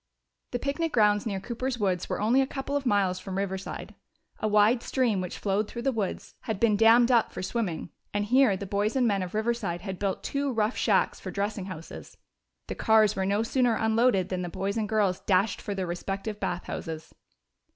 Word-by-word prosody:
The 245 - -2
picnic 290 +5 -2
grounds 210 -2 +3
near 195 -3 -2
Cooper's 245 +5 -3
woods 185 -5 -1
were - - -2
only 235 +6 +3
a 265 - 0
couple 275 +1 -4
of 280 -2 -1
miles 195 -4 +2
from 190 0 -5
Riverside. 195 -1 -4 0.5
A - - 0
wide 215 +3 +4
stream 240 -8 0
which 180 - -5
flowed 205 +1 0
through 235 +2 -6
the 270 - +2
woods 215 -6 -3
had 220 -4 -2
been 225 -3 +4
dammed 230 +3 +6
up 235 -3 +3
for - - -6
swimming, 190 -5 -3 0.2
and 205 0 -1
here 245 -3 +4
the 200 - -6
boys 205 +4 -1
and 255 -2 +3
men 200 -3 +1
of 185 +2 -5
Riverside 215 -6 -1
had 190 -1 -6
built 195 -2 -2
two 280 0 -1
rough 220 -1 0
shacks - - +2
for - - -7
dressing 200 -1 -2
houses. 175 -4 -9 0.5
The - - -4
cars 220 -2 +4
were 190 0 -1
no 205 +3 +1
sooner 245 0 +2
unloaded 220 -4 +2
than 185 -1 -2
the 175 - -3
boys 195 +3 -3
and 215 -2 -1
girls 205 -4 +1
dashed 195 +2 +1
for 205 - -4
their 190 -1 -2
respective 195 +4 -4
bath 175 0 -2
houses. 160 -1 -6
210 Hz, 205 wpm, -27 LUFS, 190-235 Hz, 0.5 s, dammed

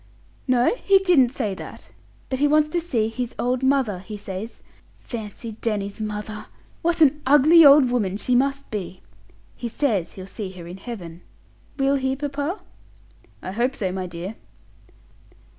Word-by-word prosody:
"No 250 - +3
he 395 -4 +4
didn't 350 -10 +4
say 235 -6 -2
that. - - -10 0.4
But 260 - -1
he 290 - +4
wants 305 +1 +3
to 345 +2 -1
see 240 -10 0
his 240 +1 -4
old 250 +1 0
mother, 265 -8 +1
he 210 +3 -8
says. 200 +3 -7 0.3
Fancy 225 0 -7
Danny's 205 -3 -2
mother! 210 0 -5 0.3
What 340 0 0
an 300 0 +5
ugly 295 +5 +7
old 280 -3 +7
woman 200 -6 0
she 250 - 0
must 275 +2 +1
be! 190 -3 -5 0.5
He 240 - -5
says 220 - -1
he'll 185 - -9
see 195 0 -6
her 175 -2 -10
in 175 +2 -8
Heaven. 180 -6 -8 0.6
Will 275 0 +2
he, 265 0 -1
papa?" 290 +6 -3 0.8
"I 185 - -4
hope 245 +6 0
so, 190 -4 -2
my 185 0 -4
dear." 175 +4 -6
245 Hz, 160 wpm, -23 LUFS, 200-280 Hz, 0.8 s, ugly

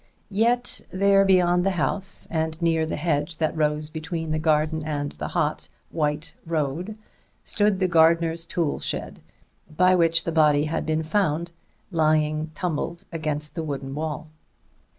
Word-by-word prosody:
Yet 240 +4 +1
there 195 +1 +4
beyond 180 -2 +4
the 195 - +2
house, 195 +5 -1
and 160 -1 -1
near 165 -2 +1
the - - -2
hedge 155 0 -1
that 160 -1 0
rose 150 -1 0
between 160 +1 -4
the 155 - 0
garden 155 0 +1
and 145 -2 -3
the - - -5
hot, 155 -3 -1 0.2
white 150 -1 -1
road, 165 +6 -2 0.5
stood 205 -2 +2
the 185 -1 +1
gardener's 165 0 +3
tool 165 -4 -1
shed, - - -4 0.5
by 180 +4 +3
which 165 -2 +3
the 170 - -2
body 150 -2 +4
had 160 +1 -2
been 155 0 0
found, 170 -1 0 0.4
lying 155 -1 +1
tumbled 170 0 -3
against 150 -2 -2
the 165 - -3
wooden 140 -3 -4
wall. 155 +1 -4
160 Hz, 150 wpm, -24 LUFS, 155-175 Hz, 0.5 s, there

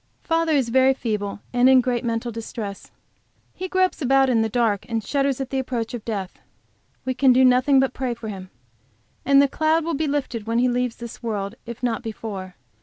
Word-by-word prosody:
Father 330 -1 +1
is 265 -5 +2
very 260 +2 +4
feeble 210 -5 -3
and 245 +1 +5
in 260 -1 +7
great 250 0 0
mental 230 0 -2
distress. 220 -3 -7 0.6
He 370 - -5
gropes 370 -2 +1
about 270 0 +3
in 230 -2 +3
the 225 - 0
dark, 220 -3 +1
and 225 -2 -1
shudders 275 +2 0
at 265 -1 -4
the 270 - 0
approach 245 -3 -3
of 235 -3 -5
death. 200 -5 -5 0.7
We 260 - 0
can 260 +1 +4
do 260 +1 +5
nothing 255 +2 +4
but 265 0 +1
pray 255 -2 -2
for 230 -1 -8
him. 190 -3 -7 0.8
And 275 +1 +6
the - - +3
cloud 315 +3 +1
will 335 - -1
be 310 +1 -1
lifted 260 -6 -3
when 230 +1 0
he 250 +1 +3
leaves 245 -1 -1
this 235 -1 -9
world, 205 -4 -3
if 235 +1 -8
not 235 -2 0
before. 205 -5 -6
245 Hz, 205 wpm, -23 LUFS, 225-270 Hz, 0.8 s, in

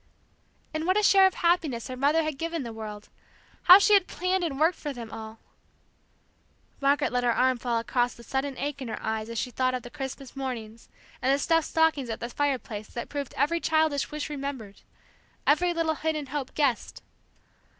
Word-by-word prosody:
And 315 +2 -2
what 370 +2 +3
a 425 - +2
share 390 -1 +7
of 380 - -3
happiness 330 -9 +1
her 255 - -5
mother 290 +5 +2
had 310 -3 -4
given 330 -2 -2
the 230 -2 -6
world! 210 -1 -8 0.6
How 365 - +11
she 415 +1 +4
had 395 -3 +5
planned 365 0 -1
and 285 -5 -2
worked 325 +3 +3
for 295 - -4
them 230 -3 -8
all, 220 0 -8 1.4
Margaret 285 +1 +2
let 245 0 0
her 240 - +3
arm 255 +1 +2
fall 235 -1 -1
across 240 +1 0
the 235 - -13
sudden 270 +2 -2
ache 285 0 -3
in 260 - -4
her 225 - -4
eyes 220 0 -2
as 230 - -5
she 250 - -2
thought 255 +1 0
of 250 - -5
the 245 - -10
Christmas 270 -2 -7
mornings, 235 -4 -6 0.3
and 260 +2 +2
the 275 - +4
stuffed 325 +2 +2
stockings 320 -6 +2
at 225 - -4
the 235 - -4
fireplace 250 -7 -2
that 240 - -6
proved 285 -3 -5
every 315 +5 +2
childish 315 -3 +1
wish 300 -1 -4
remembered, 275 -8 -6 0.6
every 350 +4 +3
little 330 -2 0
hidden 310 -1 -2
hope 275 -1 -5
guessed! 275 -6 0
275 Hz, 195 wpm, -27 LUFS, 240-315 Hz, 1.4 s, How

